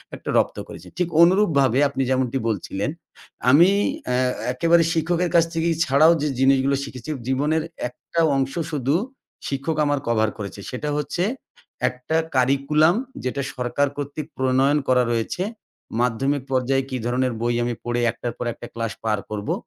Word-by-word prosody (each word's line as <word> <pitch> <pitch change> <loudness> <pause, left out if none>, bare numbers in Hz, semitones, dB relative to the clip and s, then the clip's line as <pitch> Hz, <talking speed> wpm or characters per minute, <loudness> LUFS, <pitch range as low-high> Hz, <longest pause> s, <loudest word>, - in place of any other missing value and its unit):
একটা - - -8
রপ্ত - - +1
করেছেন। - - -11
ঠিক 180 -2 +1
অনুরূপভাবে 155 - +3
আপনি 135 - -3
যেমনটি 130 0 +1
বলছিলেন, 100 +1 -2 0.6
আমি 165 +8 +7 0.4
অ্যা 125 - +1 0.4
একেবারে 165 +6 +4
শিক্ষকের 170 +2 0
কাছ 170 - +7
থেকে 165 0 0 0.2
ছাড়াও 145 +4 +5
যে, 150 - +1
জিনিসগুলো 135 +1 +3
শিখেছি, 130 0 -8 0.2
জীবনের 150 +4 +1 0.3
একটা 165 +6 -6 0.2
অংশ 135 0 0 0.2
শুধু, 140 -1 0 0.5
শিক্ষক 140 +3 -2
আমার 145 -1 +1
কভার 110 -2 +2
করেছে। 100 -1 -7
সেটা 140 +4 -4
হচ্ছে 150 +4 -2 0.7
একটা 130 +5 -3 0.2
কারিকুলাম, 140 +6 +3 0.3
যেটা 130 +2 -2
সরকার 130 +3 0
কর্তৃক 145 +1 -5
প্রণয়ন 130 +2 +3
করা 125 -1 +4
রয়েছে। 115 +10 -1 0.6
মাধ্যমিক 130 +3 0
পর্যায়ে 135 +1 +1
কি 130 - -2
ধরনের 125 +1 0
বই 120 0 +1
আমি 120 0 -1
পড়ে, 120 0 -1
১ - - -4
টার 120 - -3
পর - - -4
১ - - -11
টা - - -6
ক্লাস 115 -3 -3
পার 110 -2 0
করবো? 105 -1 -2
135 Hz, 155 wpm, -23 LUFS, 125-150 Hz, 0.7 s, আমি